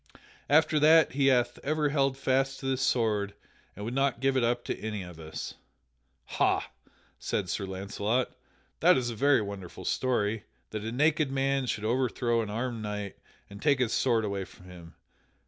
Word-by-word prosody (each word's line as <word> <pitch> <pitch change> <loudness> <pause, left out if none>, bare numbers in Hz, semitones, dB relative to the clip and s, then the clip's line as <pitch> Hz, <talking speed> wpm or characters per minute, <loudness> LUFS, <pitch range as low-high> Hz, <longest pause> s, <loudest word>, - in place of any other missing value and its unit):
After 155 +1 +4
that 155 0 +6
he 135 +1 +2
hath 120 -2 +2
ever 150 +1 +1
held 135 -2 +1
fast 135 0 0
to - - -8
this 135 -1 0
sword 105 -6 +1 0.4
and 105 - -6
would 115 - -3
not 135 -2 +1
give 135 +1 +1
it 130 - +2
up 120 +1 +1
to - - -3
any 105 -3 -4
of 90 -2 -11
us." 80 -1 -6 0.7
"Ha!" - - 0 0.5
said - - -2
Sir 100 - -2
Launcelot, 100 +6 -2 0.4
"that - - +6
is 120 -2 -1
a - - -6
very 135 -1 +3
wonderful 100 -3 -8
story, 110 -4 0 0.3
that 110 - -4
a 110 - -3
naked 150 +2 +2
man 135 -1 0
should 110 -2 -2
overthrow 120 0 +1
an 110 - -4
armed 115 +1 -3
knight 105 -1 -5 0.3
and 100 +1 -11
take 145 -3 +3
his 125 -3 0
sword 115 -4 +2
away 100 -1 -2
from 90 - -15
him. 85 -2 -12
120 Hz, 180 wpm, -29 LUFS, 105-135 Hz, 0.7 s, that